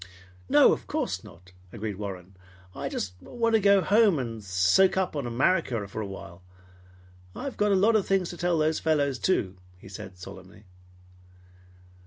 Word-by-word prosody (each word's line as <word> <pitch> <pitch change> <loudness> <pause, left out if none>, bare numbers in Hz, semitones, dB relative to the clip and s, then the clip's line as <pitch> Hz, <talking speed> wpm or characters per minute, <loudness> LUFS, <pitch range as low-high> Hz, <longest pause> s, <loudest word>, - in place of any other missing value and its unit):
"No, - - +6
of - - -6
course - - -3
not," 90 +2 -16 0.2
agreed 105 -3 -5
Warren. 95 -2 -7 0.4
"I - - -5
just 90 - -4
want 230 - -1
to 220 - +4
go 200 0 +5
home 205 -3 +4
and 115 -4 -5
soak 95 - +3
up 190 -4 -1
on 140 -4 -3
America 120 - 0
for 105 +2 -6
awhile. 95 -3 -8 0.9
I've 275 - -5
got 210 0 +1
a - - +4
lot 210 +4 +3
of 210 - +1
things 190 -3 +1
to 175 - -9
tell 175 -1 0
those 155 0 +1
fellows, 145 -4 0
too!" 95 - 0 0.2
he 90 - -15
said 95 -1 -10
solemnly. 95 +1 -12
125 Hz, 165 wpm, -27 LUFS, -, 0.9 s, No